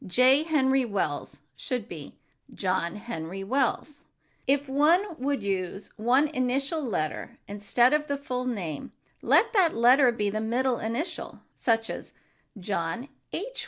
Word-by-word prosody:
"J. 255 +8 +5
Henry 270 -4 +2
Wells" 190 -11 -3
should 235 - -3
be 155 -8 -9 0.3
"John 185 -3 -1
Henry 195 -4 -6
Wells." 275 +5 -1 0.4
If 280 +1 +2
one 300 +8 +4
would 270 -3 -1
use 195 0 -3
one 255 +7 +3
initial 275 +3 0
letter 185 - -3
instead 210 +6 +2
of 300 0 +1
the 285 - -1
full 255 -3 -3
name, 180 - -4 0.3
let 455 +1 +4
that 370 -6 +4
letter 250 +3 +6
be 210 -3 -1
the 215 +1 -2
middle 240 +2 0
initial, 235 +10 -4 0.3
as 225 -1 0 0.5
"John 195 +6 -3 0.2
H. - - -4
245 Hz, 130 wpm, -27 LUFS, 200-280 Hz, 0.5 s, letter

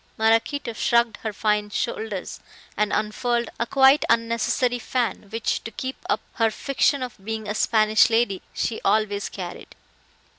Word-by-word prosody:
Maraquito 225 +4 +1
shrugged 235 +1 +2
her 220 - -4
fine 210 0 0
shoulders 205 -2 -4 0.4
and 210 0 0
unfurled 235 +2 -1
a 235 - 0
quite 270 +3 +5
unnecessary 235 +2 +1
fan, 235 -3 -2
which, 225 +1 -2
to - - -5
keep 260 +4 -5
up - - +1 0.2
her 225 -2 +3
fiction 275 +3 0
of 250 -3 -5
being 220 0 -4
a 210 - -1
Spanish 215 +1 +4
lady, 225 -4 +1
she 225 - -2
always 205 0 +1
carried. 180 -3 -8
225 Hz, 145 wpm, -24 LUFS, 210-240 Hz, 0.4 s, quite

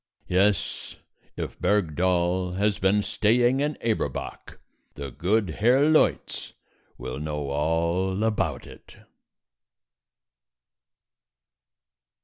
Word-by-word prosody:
Yes, 95 +1 0 0.4
if - - -5
Bergdoll 90 -1 +1
has 105 +1 +1
been 100 +2 +2
staying 120 +6 +2
in 150 +1 -1
Eberbach, 110 - -3 0.4
the 70 -2 -6
good 95 - 0
Herr 125 +5 +4
Leutz 155 0 +1 0.4
will 65 +2 -6
know 75 -2 -4
all 85 +6 0
about 80 - -1
it. - - -15
95 Hz, 85 wpm, -25 LUFS, 80-105 Hz, 0.4 s, Herr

